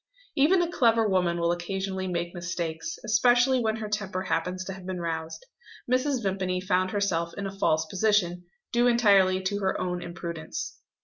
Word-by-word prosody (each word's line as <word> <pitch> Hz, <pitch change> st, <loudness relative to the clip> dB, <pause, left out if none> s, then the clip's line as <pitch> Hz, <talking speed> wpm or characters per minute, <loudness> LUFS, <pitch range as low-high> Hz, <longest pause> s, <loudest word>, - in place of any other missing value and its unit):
Even 350 Hz, +6 st, +4 dB
a -, -, 0 dB
clever 230 Hz, -7 st, +3 dB
woman 180 Hz, -3 st, +1 dB
will 170 Hz, 0 st, +2 dB
occasionally 190 Hz, +2 st, -3 dB
make 175 Hz, -1 st, -2 dB
mistakes; 175 Hz, -, -4 dB
especially 245 Hz, +3 st, +4 dB
when 220 Hz, -2 st, 0 dB
her 220 Hz, -1 st, -5 dB
temper 205 Hz, -3 st, -3 dB
happens 180 Hz, +2 st, -2 dB
to 195 Hz, -, -5 dB
have 190 Hz, 0 st, -10 dB
been 185 Hz, 0 st, -4 dB
roused. 160 Hz, -1 st, -4 dB, 0.4 s
Mrs. 255 Hz, 0 st, +1 dB
Vimpany 190 Hz, -2 st, -1 dB
found 185 Hz, 0 st, +1 dB
herself 170 Hz, -5 st, -1 dB
in 200 Hz, -, -3 dB
a 195 Hz, 0 st, -5 dB
false 160 Hz, -4 st, +1 dB
position, 180 Hz, -1 st, +1 dB, 0.3 s
due 240 Hz, +1 st, +4 dB
entirely 200 Hz, -6 st, +4 dB
to 200 Hz, +2 st, -1 dB
her 190 Hz, -1 st, 0 dB
own 180 Hz, -1 st, -2 dB
imprudence. 170 Hz, -, -6 dB
190 Hz, 170 wpm, -27 LUFS, 175-215 Hz, 0.4 s, Even